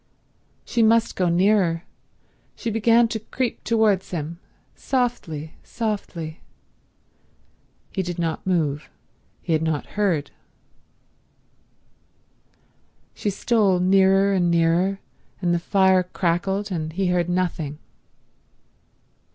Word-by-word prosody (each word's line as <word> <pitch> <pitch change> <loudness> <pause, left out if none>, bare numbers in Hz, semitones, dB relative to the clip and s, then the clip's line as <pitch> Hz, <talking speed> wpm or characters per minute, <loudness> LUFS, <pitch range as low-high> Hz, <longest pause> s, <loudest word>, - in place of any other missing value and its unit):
She 235 - 0
must 225 +1 +3
go 180 -2 +1
nearer. 175 -2 +2 0.7
She 230 - -4
began 230 +2 +4
to 225 - -3
creep 245 +3 -3
towards 215 -5 +2
him—softly, 170 - -4
softly. 190 -8 -4 1.5
He 190 - -1
did 175 -1 -4
not 165 +1 -3
move. 155 -5 0 0.5
He 165 - -1
had 155 - +2
not 160 -2 -1
heard. 185 -8 0 2.8
She 210 - -2
stole 200 -2 +2
nearer 195 +1 +4
and 180 -2 +2
nearer, 170 +3 +2 0.4
and 175 -2 +1
the 175 - +1
fire 190 +1 +3
crackled 190 +3 -1
and 160 -3 -3
he 190 +3 -1
heard 175 -1 +1
nothing. 170 -5 -1
185 Hz, 100 wpm, -23 LUFS, 170-205 Hz, 2.8 s, began